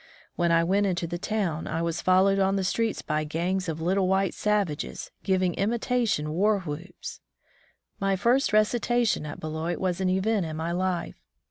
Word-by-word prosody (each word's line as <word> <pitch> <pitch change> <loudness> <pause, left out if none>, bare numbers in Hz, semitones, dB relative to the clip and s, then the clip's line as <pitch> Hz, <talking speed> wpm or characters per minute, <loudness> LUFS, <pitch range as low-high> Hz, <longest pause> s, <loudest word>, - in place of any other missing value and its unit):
When 170 -1 +1
I 165 0 +4
went 200 +4 +2
into 175 -2 -1
the 175 +1 -4
town, 185 -7 -2
I 165 +1 -2
was 170 0 -2
followed 190 +2 +4
on 195 0 +2
the 195 - 0
streets 225 +4 -1
by 155 0 -1
gangs 175 +4 -1
of 160 0 -3
little 185 +3 +1
white 190 0 +2
savages, 205 -8 -1
givmg 185 -2 +1
imitation 225 -6 0
war 200 +5 +2
whoops. 175 +2 -7 0.8
My 195 0 +1
first 240 +8 +2
recitation 220 -3 +2
at - - -7
Beloit 160 +2 -3
was 185 -1 -1
an 185 - +2
event 190 0 +1
in 155 0 -5
my 165 +2 -2
life. 180 0 -2
185 Hz, 170 wpm, -27 LUFS, 170-200 Hz, 0.8 s, I